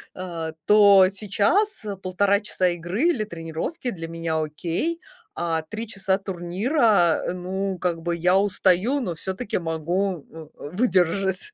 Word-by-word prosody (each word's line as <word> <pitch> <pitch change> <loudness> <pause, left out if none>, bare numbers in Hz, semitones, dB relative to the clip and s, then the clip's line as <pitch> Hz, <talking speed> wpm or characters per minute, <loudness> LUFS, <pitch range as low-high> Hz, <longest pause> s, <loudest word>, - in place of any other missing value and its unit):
а 170 -3 -5 0.2
то 200 -2 +7
сейчас, 210 - 0
э, 205 -1 -4
1,5 195 +2 +1
часа 185 -3 +1
игры 175 - -2
или 335 -10 +2
тренировки 170 - -4
для 165 -4 -6
меня 165 -1 -2
окей, 170 - -2 0.4
а 165 -1 -1
3 220 +2 -5
часа 195 -2 0
турнира, 195 - +1
э, - - -1
ну, 190 +1 -3
как 170 -2 -1
бы 170 +1 -2
я 180 +2 +3
устаю, 200 +5 +2
но 180 -10 -3
всё-таки 190 +7 -2
могу, 170 +2 -2
м, 160 -2 -11 0.2
выдержать. 190 - +1
185 Hz, 140 wpm, -23 LUFS, 170-205 Hz, 0.4 s, то